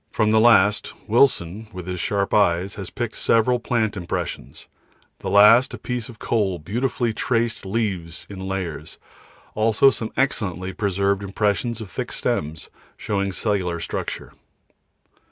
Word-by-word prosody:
From 110 -1 +1
the 110 - +5
last 105 -3 +4
Wilson, 110 -4 +2
with 90 -2 -8
his 90 -1 -4
sharp 100 +2 -1
eyes, 95 -1 +2
has 95 -3 -7
picked 120 -2 -4
several 120 +2 +2
plant 115 -4 0
impressions, 90 -4 -5 0.5
the - - -4
last 105 +5 +6
a - - -9
piece 125 -2 -4
of 115 - -11
coal 105 -4 0
with 80 -4 -9
beautifully 120 +1 -1
traced 115 -3 -1
leaves 95 -6 -3
in 100 -2 -9
layers, 95 -5 -5 0.6
also 115 +5 +4
some 110 -3 -4
excellently 95 - -1
preserved 100 -1 0
impressions 105 +3 -1
of 100 -5 -8
thick - - -4
stems, 80 +2 -3 0.3
showing 100 -1 -2
cellular 95 -4 -1
structure. - - -5
105 Hz, 140 wpm, -22 LUFS, 95-115 Hz, 0.6 s, last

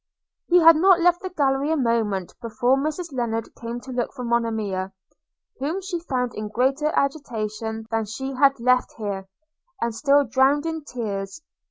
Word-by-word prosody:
He 355 +1 +5
had 330 -1 +8
not 370 +2 +5
left 350 0 +3
the 375 - -4
gallery 280 -4 +1
a 320 - +1
moment 225 - 0
before 240 +2 +1
Mrs 310 +3 -3
Lennard 230 -3 -2
came 235 +1 -6
to 260 - -9
look 245 -2 -2
for 250 - -6
Monimia, 220 -5 -1 0.7
whom 305 +8 -2
she 375 -2 -4
found 255 -7 -2
in 215 0 -5
greater 270 +7 +1
agitation 225 -6 -2
than 225 -1 0
she 265 +6 -5
had 275 0 +3
left 250 +1 +2
here, 200 -3 -4 0.5
and 235 -1 -1
still 280 +4 +3
drowned 265 +5 +2
in 320 -1 -3
tears. 210 -1 -5
250 Hz, 165 wpm, -23 LUFS, 225-295 Hz, 0.7 s, had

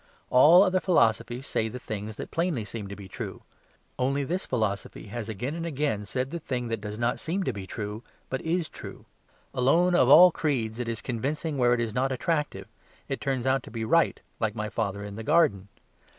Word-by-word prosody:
All 160 +9 +8
other 185 -1 +2
philosophies 120 - +2
say 110 - 0
the 110 - -6
things 110 -3 -6
that - - -7
plainly 165 -10 -1
seem 105 0 -6
to 100 - -7
be 100 -1 -10
true; - - -7 0.6
only 135 +2 +1
this 180 +7 -2
philosophy 110 -3 -2
has 115 0 -5
again 120 +7 -3
and 165 0 -4
again 145 -10 -1
said 130 +5 -3
the 170 - -3
thing 125 -5 -3
that 115 -2 -2
does 105 0 -6
not 120 +1 0
seem 185 +4 -2
to 130 - -1
be 100 -2 -7
true, 105 +1 -5 0.3
but 130 - -3
is 165 0 -1
true. - - -10 0.5
Alone 165 +8 +3
of 130 -7 +4
all 180 +5 +9
creeds 120 -9 -1
it 120 -1 -2
is 115 -2 -4
convincing 140 +5 -2
where 120 -1 +4
it - - -3
is 115 -2 -2
not 130 +3 0
attractive; 150 +4 -1 0.4
it - - -3
turns 130 -3 -1
out 130 +1 +2
to - - -12
be 110 0 -4
right, 165 +7 +2 0.2
like 110 -2 -1
my 105 -1 -3
father 100 -2 -2
in 100 0 -7
the - - -5
garden. 110 - +3
125 Hz, 210 wpm, -27 LUFS, 110-150 Hz, 0.6 s, all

